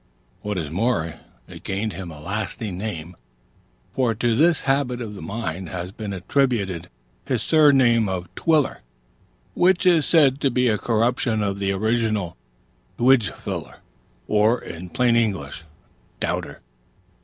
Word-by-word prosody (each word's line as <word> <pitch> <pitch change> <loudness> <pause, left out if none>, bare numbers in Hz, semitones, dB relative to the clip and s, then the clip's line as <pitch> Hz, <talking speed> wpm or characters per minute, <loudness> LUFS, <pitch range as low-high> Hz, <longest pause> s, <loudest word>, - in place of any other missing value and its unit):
What 105 -1 -3
is 75 -4 -3
more, 85 -4 -1 0.3
it - - -11
gained 100 +3 -2
him 95 -3 -7
a 75 -3 -10
lasting 100 +3 -4
name; 90 -4 -5 0.8
for 120 -4 +1
to 115 +1 +1
this 160 +4 +3
habit 135 -2 0
of 110 -4 -6
the 100 - -9
mind 95 -5 -4
has 90 0 -5
been 105 0 -6
attributed 100 -4 -1 0.4
his - - -1
surname 130 -8 +4
of 90 -2 -3
Twiller; 155 - +1 0.7
which 180 0 +3
is 170 -5 +4
said 145 -5 +4
to 135 - +3
be 125 0 +1
a 105 -2 +1
corruption 115 -1 +1
of 100 -1 -2
the 100 -1 0
original 110 -2 0 0.6
Twijfler, 125 -3 +1 0.5
or, 110 +3 +3
in 85 +2 -8
plain 120 +4 +2
English, 95 -10 -1 0.5
Doubter. - - -3
110 Hz, 135 wpm, -23 LUFS, 95-125 Hz, 0.8 s, surname